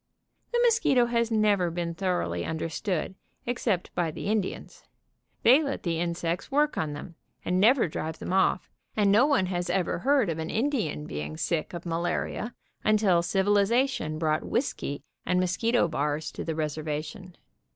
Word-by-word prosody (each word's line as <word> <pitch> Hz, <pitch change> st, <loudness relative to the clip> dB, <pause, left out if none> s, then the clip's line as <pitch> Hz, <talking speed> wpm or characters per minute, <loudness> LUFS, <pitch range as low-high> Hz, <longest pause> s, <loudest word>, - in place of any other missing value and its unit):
The 480 Hz, -, +1 dB
mosquito 435 Hz, -, +4 dB
has 235 Hz, -1 st, +1 dB
never 210 Hz, -5 st, +2 dB
been 170 Hz, 0 st, -3 dB
thoroughly 165 Hz, -, -1 dB
understood, 165 Hz, -, -2 dB, 0.3 s
except 235 Hz, -6 st, -1 dB
by 175 Hz, -2 st, 0 dB
the 155 Hz, -, -7 dB
Indians. 215 Hz, -3 st, -3 dB, 0.6 s
They 260 Hz, +6 st, +7 dB
let 280 Hz, -3 st, -3 dB
the 165 Hz, -2 st, -1 dB
insects 170 Hz, 0 st, -2 dB
work 295 Hz, +2 st, +2 dB
on 155 Hz, -2 st, -2 dB
them, 145 Hz, +4 st, -8 dB, 0.3 s
and 180 Hz, +1 st, +1 dB
never 230 Hz, +2 st, +5 dB
drive 160 Hz, 0 st, -4 dB
them 180 Hz, -, -4 dB
off, 190 Hz, -1 st, +2 dB, 0.3 s
and 205 Hz, -2 st, +4 dB
no 230 Hz, +7 st, +5 dB
one 275 Hz, -11 st, +2 dB, 0.2 s
ever 180 Hz, -1 st, 0 dB
heard 265 Hz, -5 st, +2 dB
of 160 Hz, -, -4 dB
an 160 Hz, +1 st, -3 dB
Indian 220 Hz, -, -1 dB
being 75 Hz, -, -5 dB
sick 170 Hz, -, -2 dB
of 170 Hz, -, -7 dB
malaria 175 Hz, +7 st, -2 dB, 0.3 s
until 205 Hz, -5 st, +4 dB
civilization 205 Hz, -, +1 dB
brought 155 Hz, -1 st, 0 dB
whisky 145 Hz, -, -2 dB, 0.2 s
and 180 Hz, -, +1 dB
mos 185 Hz, 0 st, +1 dB
quito 230 Hz, -4 st, +2 dB
bars 150 Hz, -1 st, -2 dB
to -, -, -6 dB
the 160 Hz, -, -3 dB
reservation. 155 Hz, +4 st, -4 dB
180 Hz, 155 wpm, -27 LUFS, 160-225 Hz, 0.6 s, They